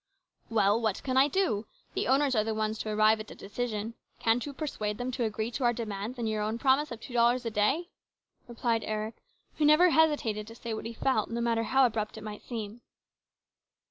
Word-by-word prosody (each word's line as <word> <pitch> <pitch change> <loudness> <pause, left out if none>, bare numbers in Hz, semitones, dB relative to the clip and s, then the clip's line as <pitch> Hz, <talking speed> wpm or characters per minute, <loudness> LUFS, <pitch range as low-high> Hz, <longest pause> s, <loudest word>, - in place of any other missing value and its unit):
" - - -55
Well, 215 0 +3
what 220 -4 -1
can 260 -1 -1
I 265 +2 +6
do? 295 - 0 0.3
The - - -1
owners 270 +1 +3
are 215 - +3
the 220 0 -2
ones 215 0 -1
to 215 - -3
arrive 215 +1 +4
at 215 - -8
a - - -10
decision. 220 +1 -4 0.2
Can't 225 +1 +2
you - - -4
persuade 215 -8 -3
them 250 +1 -3
to 245 -2 -1
agree 220 +1 -2
to 255 - -3
our 240 0 +4
demands 220 +1 -4
and 235 -2 -2
your 215 -1 -1
own 215 +2 -1
promise 270 +3 +2
of 235 - -6
two 245 - -10
dollars 240 +1 +3
a 230 - -2
day? 270 - +1 0.3
" - - -45
replied 235 -1 0
Eric, 215 +1 -3 0.4
who - - +2
never 320 +4 +6
hesitated 290 -10 +2
to 225 - -10
say 230 -1 -5
what 220 - -5
he 230 - -5
felt, 230 -2 0
no 235 - -3
matter 230 -1 +1
how 265 +3 +4
abrupt 215 -3 -2
it - - -8
might 210 -1 -7
seem. 225 -1 -6
230 Hz, 225 wpm, -29 LUFS, 215-255 Hz, 0.4 s, I